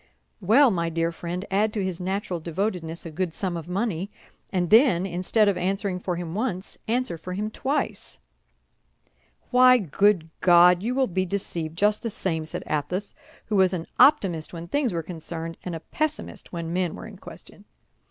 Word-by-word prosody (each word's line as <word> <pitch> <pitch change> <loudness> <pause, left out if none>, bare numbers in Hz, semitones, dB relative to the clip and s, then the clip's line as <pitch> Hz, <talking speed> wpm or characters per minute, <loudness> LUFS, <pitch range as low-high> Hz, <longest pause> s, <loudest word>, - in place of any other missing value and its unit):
"Well, 230 +7 +5
my 170 -3 0
dear 165 0 0
friend, 175 +3 -5
add 210 +2 +2
to 205 - -1
his 185 -1 -4
natural 190 -1 -2
devotedness 170 0 -3
a 165 - -6
good 170 +1 -3
sum 185 -3 -2
of 165 -1 -6
money, 195 -1 -2 0.4
and 180 -3 -1
then, 220 -6 +5
instead 195 +4 +1
of 200 - +2
answering 190 +1 -1
for 180 -1 -2
him 170 -1 -5
once, 200 -3 -3
answer 230 -7 -1
for 180 +3 -6
him 210 +3 -3
twice." 275 +6 -3 1.3
"Why, 255 0 +7
good 190 - +2
God! 175 0 +6
you 240 +5 -1
will 265 0 +3
be 185 -3 -1
deceived 170 -4 -3
just 210 +2 +2
the 230 - -2
same," 160 -6 -2
said - - -5
Athos, 165 +7 -2 0.3
who 215 - -2
was 190 -1 +4
an 170 -2 -3
optimist 180 - +4
when 170 0 -7
things 270 +4 0
were 165 -2 -2
concerned, 165 0 -6
and 180 -2 -4
a - - -5
pessimist 310 - -4
when 170 -1 -4
men 180 -2 0
were - - -9
in - - -10
question. - - -12
185 Hz, 180 wpm, -25 LUFS, 170-210 Hz, 1.3 s, Why